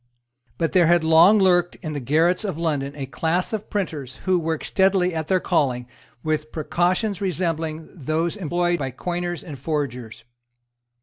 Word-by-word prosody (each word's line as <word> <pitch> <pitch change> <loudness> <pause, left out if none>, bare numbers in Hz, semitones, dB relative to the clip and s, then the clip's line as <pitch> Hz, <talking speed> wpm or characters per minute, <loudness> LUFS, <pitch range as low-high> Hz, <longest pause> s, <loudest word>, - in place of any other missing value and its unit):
But 165 -2 0
there 180 -4 +4
had 170 -1 +4
long 165 +6 +6
lurked 175 -3 +3
in 155 -2 -4
the 145 - -3
garrets 160 - +2
of 190 -7 -3
London 145 -4 -1
a 140 -2 -4
class 165 - -1
of 215 -1 -4
printers 155 -10 -3
who 185 -1 +3
worked 160 -1 -2
steadily 190 -2 +2
at 160 -1 -3
their 185 +1 +2
calling 135 -9 0 0.4
with 155 -1 -2
precautions 175 +6 0
resembling 165 -4 -2
those 160 +3 -2
employed 175 -2 0
by 135 -2 -2
coiners 175 +5 -4
and 145 -6 -9
forgers. 125 -6 -4
165 Hz, 160 wpm, -23 LUFS, 150-180 Hz, 0.4 s, long